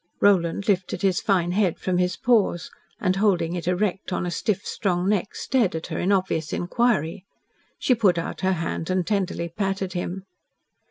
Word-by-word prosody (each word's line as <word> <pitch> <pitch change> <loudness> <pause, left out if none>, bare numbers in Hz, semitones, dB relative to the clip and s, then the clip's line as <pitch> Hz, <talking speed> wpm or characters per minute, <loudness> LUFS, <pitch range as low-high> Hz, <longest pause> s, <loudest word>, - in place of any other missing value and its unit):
Roland 195 -1 +3
lifted 190 -1 0
his 190 -3 +2
fine 180 -4 +1
head 190 -2 +1
from 180 -1 -1
his 180 0 +1
paws, 215 -8 +1 0.3
and, 185 +1 +1
holding 185 -5 +2
it 175 -1 -4
erect 190 +1 -1
on 180 - -1
a 175 - -2
stiff, 200 +2 -1
strong 180 -2 -1
neck, 205 -1 0
stared 240 -10 +1
at 160 - -4
her - - -2
in 185 - +1
obvious 185 -5 0
inquiry. 180 -4 0 0.5
She 255 - +2
put 205 -7 +3
out 165 - -4
her 190 0 +2
hand 165 -1 -3
and 185 -1 +1
tenderly 190 -4 -1
patted 195 +1 -2
him. 180 +1 -4
185 Hz, 175 wpm, -24 LUFS, 175-200 Hz, 0.5 s, Roland